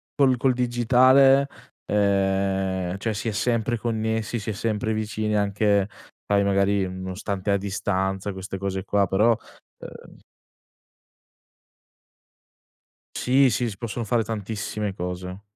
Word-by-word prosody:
col 135 -3 +3
col 130 +1 +2
digitale, 130 +3 +4 0.4
ehm, 95 -2 0
cioè 110 +2 -2
si 110 - -4
è - - 0
sempre 115 +1 0
connessi, 110 0 -2
si 110 0 -4
è - - -4
sempre 110 +1 -1
vicini, 110 0 -2
anche 100 -1 +2 0.4
poi 100 0 +2
magari 100 0 +2
nonostante 95 +2 -4
a 100 - +3
distanza 95 0 -2
queste 95 0 -6
cose 95 -1 -3
qua; 100 0 +1
però 105 +6 +3 0.5
uhm - - -12 2.9
Sì, 130 +2 +3
sì, 120 +1 0
si 100 - -9
possono 115 +1 -4
fare 115 +1 +1
tantissime 105 -1 -4
cose. 90 +1 -6
105 Hz, 120 wpm, -24 LUFS, 95-115 Hz, 2.9 s, digitale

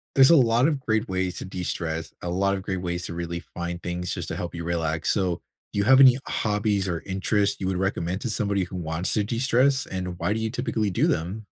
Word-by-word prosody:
There's 135 +1 +7
a 170 - +8
lot 120 -1 +4
of 145 -4 -1
great 110 -1 0
ways 95 -1 -2
to - - -5
destress, 85 -3 -4
a 90 - -4
lot 100 +3 +1
of 95 - -2
great 95 -2 -3
ways 90 0 -3
to - - -5
really 85 0 -4
find 85 0 -6
things 90 0 -3
just - - -4
to - - -4
help 85 - -5
you 85 -1 -5
relax, 80 -2 -1
so 90 -4 0 0.3
do - - -6
you 100 - +2
have 135 +3 +7
any 130 -2 +8
hobbies 105 -2 0
or 85 -2 -1
interests 100 +2 0
you 95 - -1
would 95 - -1
recommend 95 -1 -1
to 120 - -2
somebody 100 -3 0
who 90 - -9
wants 80 0 -1
to 105 - +2
destress, 130 +4 +2
and 90 -2 -5
why 105 - 0
do 110 - -2
you 110 - -1
typically 115 -3 -1
do 90 - +2
them? 95 +7 -2
95 Hz, 240 wpm, -25 LUFS, 85-110 Hz, 0.3 s, a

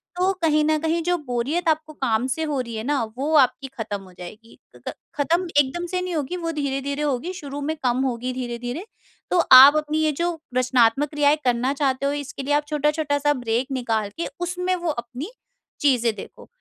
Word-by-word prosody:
तो 365 +2 +2
कहीं 305 -1 +3
न 310 0 +2
कहीं 325 +2 0
जो 355 +1 +1
बोरियत 265 +8 -1
आपको 310 0 -1
काम 245 -4 0
से 320 - -3
हो 295 -3 -1
रही 235 -2 -7
है 220 - -4
ना, 280 0 0
वो 290 +4 -1
आपकी 270 +1 +3
ख़त्म 205 -2 -3
हो 185 -1 -16
जाएगी, 215 +6 -11 0.2
क - - -17
क - - -6 0.2
ख़त्म 340 +5 +1
एकदम 290 +5 0
से 365 +1 -2
नहीं 365 -1 -3
होगी 310 +4 -2
वो 330 -1 -3
धीरे-धीरे 280 -1 -2
होगी 290 +5 -2
शुरू 290 -5 -7
में 310 +3 -2
कम 250 0 +1
होगी 250 0 -2
धीरे-धीरे, 245 - -5 0.5
तो 360 - +3
आप 265 +3 +11
अपनी 305 0 -1
ये 310 - +2
जो 345 -1 0 0.2
रचनात्मक 255 +2 +3
क्रियाएँ 295 0 +3
करना 250 +2 +1
चाहते 275 -2 0
हो 280 - +1
इसके 280 0 -7
लिए 285 +2 0
आप 295 0 +2
छोटा-छोटा 300 0 0
सा 290 +1 +2
ब्रेक 245 -1 -1
निकाल 225 -5 -1
के 335 - -1
उसमें 360 +1 -1
वो 350 -2 -3
अपनी 250 - -6 0.5
चीज़ें 245 -5 +3
देखो। 200 - -11
285 Hz, 200 wpm, -23 LUFS, 250-315 Hz, 0.5 s, आप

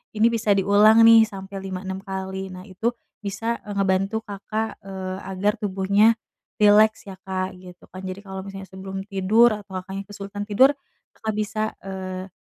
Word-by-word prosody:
ini 215 +2 +5
bisa 215 -3 +2
diulang 205 +3 +6
nih 230 0 +9
sampai 195 0 -9
5-6 190 0 -5
kali, 190 -1 -5
nah 185 0 -9
itu 200 +3 -3 0.3
bisa, 220 +3 -3
e - - -10
ngebantu 195 +3 +1
Kakak, 215 +2 -4
eee, 190 -1 -5
agar 195 +2 +1
tubuhnya 200 +3 +3 0.5
rileks 215 +1 +5
ya 190 - -10
Kak, 185 0 -3
gitu 180 -1 -14
kan. 185 - -9
Jadi 185 +2 -7
kalau 190 -1 -7
misalnya 195 -1 -7
sebelum 190 +1 -6
tidur 215 +5 +4
atau 205 -3 -6
Kakaknya 195 +1 -7
kesulitan 205 0 -6
tidur, 255 +7 +5 0.4
Kakak 220 0 -4
bisa, 215 +1 -2
eee, 190 -1 -6
195 Hz, 160 wpm, -23 LUFS, 190-215 Hz, 0.5 s, nih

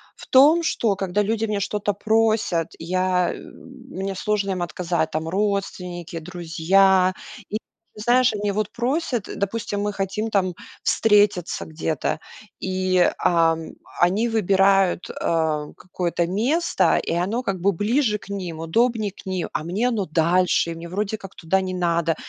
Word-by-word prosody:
в - - -13
том, 300 +6 +6
что 225 -9 +1
когда 195 +1 -1
люди 220 +2 0
у - - -6
меня 210 -1 0
что-то 205 +1 -1
просят, 215 -5 +1
я 180 +1 0
мне 195 -7 -8
сложно 200 0 -1
им 185 -2 -2
отказать, 170 -1 -1
там 160 +1 -2
родственники, 180 -3 -2
друзья. 180 +3 +2 0.4
И 215 - -1 0.4
знаешь, 240 +3 +3
они 205 -1 -1
вот 210 +1 -2
просят, 245 - -1
допустим, 205 0 -2
мы 205 0 -1
хотим 200 +3 -2
там 185 -3 +1 0.3
встретиться 205 -5 +2
где-то, 155 -1 -2 0.4
и, 185 0 0 0.3
а, 165 -1 +4 0.4
они 200 +7 +3
выбирают, 195 -3 +2
а, 155 -2 0
какое-то 175 -2 -2
место, 240 - +1
и - - -2
оно 195 +9 -1
как 190 -6 -3
бы 200 - +3
ближе 215 - +1
к 200 - -16
ним, 180 -5 -5
удобнее 220 +4 +1
к 195 - -15
ним. 185 -2 -2
А - - -2
мне 200 +9 0
оно 210 -6 -1
дальше, 170 +2 +2
и - - -5
мне 170 +1 -8
вроде 205 +3 -2
как 195 -1 -11
туда 185 +3 0
не 185 -1 -3
надо. 170 -2 +1
195 Hz, 150 wpm, -23 LUFS, 175-210 Hz, 0.4 s, том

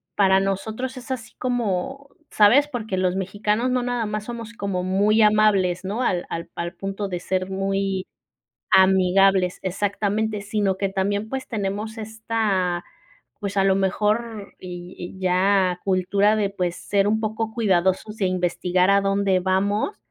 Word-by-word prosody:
para 190 -1 +4
nosotros 220 +7 -3
es 255 +1 -8
así 235 -4 -5
como, 245 +2 -2 0.2
¿sabes? 240 +8 +5
Porque 220 -8 -4
los 185 0 +1
mexicanos 210 +5 -1
no 250 0 +1
nada 245 -2 -1
más 210 0 -4
somos 230 -1 -7
como 200 -5 -3
muy 200 +4 +3
amables, 205 -4 +3
¿no?, 205 +6 -2
al 180 -8 0
al 170 - -5
al 170 0 -4
punto 195 +1 -4
de 180 -2 -4
ser 185 0 -2
muy 195 0 -1 0.7
amigables 190 0 +4
Exactamente, 205 +2 -1
sino 200 -2 0
que 195 0 -1
también 200 +3 -1
pues 265 -1 -4
tenemos 210 0 -3
esta, 215 -5 -1 0.6
pues, 200 -1 -4
a 195 - +3
lo 195 -1 +4
mejor 210 +2 -1
y 180 0 -8
y 180 +2 -8
ya 185 0 +2
cultura 195 +3 +2
de, 205 -2 0
pues, 180 -3 -2
ser 200 -1 0
un 220 +1 +1
poco 220 0 -2
cuidadosos 190 -1 +1
de 200 - 0
investigar 180 0 +1
a 200 0 +5
dónde 195 -1 +1
vamos 200 - 0
200 Hz, 150 wpm, -23 LUFS, 185-215 Hz, 0.7 s, sabes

